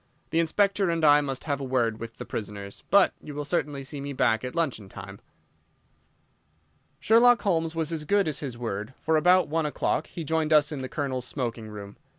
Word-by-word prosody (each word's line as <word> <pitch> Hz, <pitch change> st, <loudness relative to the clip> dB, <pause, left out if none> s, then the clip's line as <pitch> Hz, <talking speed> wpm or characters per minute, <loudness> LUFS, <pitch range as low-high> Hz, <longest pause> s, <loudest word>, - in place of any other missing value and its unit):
The 165 Hz, -, +2 dB
Inspector 195 Hz, +3 st, +2 dB
and 165 Hz, -2 st, +1 dB
I 145 Hz, 0 st, +7 dB
must 135 Hz, -3 st, -4 dB
have 145 Hz, -2 st, -2 dB
a -, -, -3 dB
word 120 Hz, -4 st, 0 dB
with 115 Hz, 0 st, -8 dB
the -, -, -7 dB
prisoners, 100 Hz, -2 st, -7 dB
but 200 Hz, -1 st, +5 dB
you 150 Hz, -, -9 dB
will 145 Hz, 0 st, -4 dB
certainly 145 Hz, -3 st, -2 dB
see 140 Hz, +1 st, -7 dB
me 140 Hz, 0 st, -5 dB
back 110 Hz, -3 st, +1 dB
at 125 Hz, +3 st, -5 dB
luncheon 135 Hz, -, -2 dB
time." 100 Hz, +1 st, -10 dB, 1.8 s
Sherlock 235 Hz, +2 st, +5 dB
Holmes 165 Hz, -4 st, 0 dB
was 160 Hz, 0 st, -1 dB
as 160 Hz, -2 st, -3 dB
good 200 Hz, +4 st, +2 dB
as 150 Hz, -, -2 dB
his 130 Hz, -5 st, -6 dB
word, 110 Hz, 0 st, -5 dB
for 160 Hz, -, +1 dB
about 180 Hz, +3 st, +4 dB
one 160 Hz, 0 st, 0 dB
o'clock 150 Hz, -, -1 dB
he 170 Hz, -, -7 dB
rejoined 160 Hz, 0 st, 0 dB
us 150 Hz, 0 st, +5 dB
in 145 Hz, -3 st, -4 dB
the 130 Hz, -, -5 dB
Colonel's 130 Hz, -3 st, -3 dB
smoking 120 Hz, -5 st, -4 dB
room. 100 Hz, -1 st, -9 dB
145 Hz, 200 wpm, -26 LUFS, 120-165 Hz, 1.8 s, I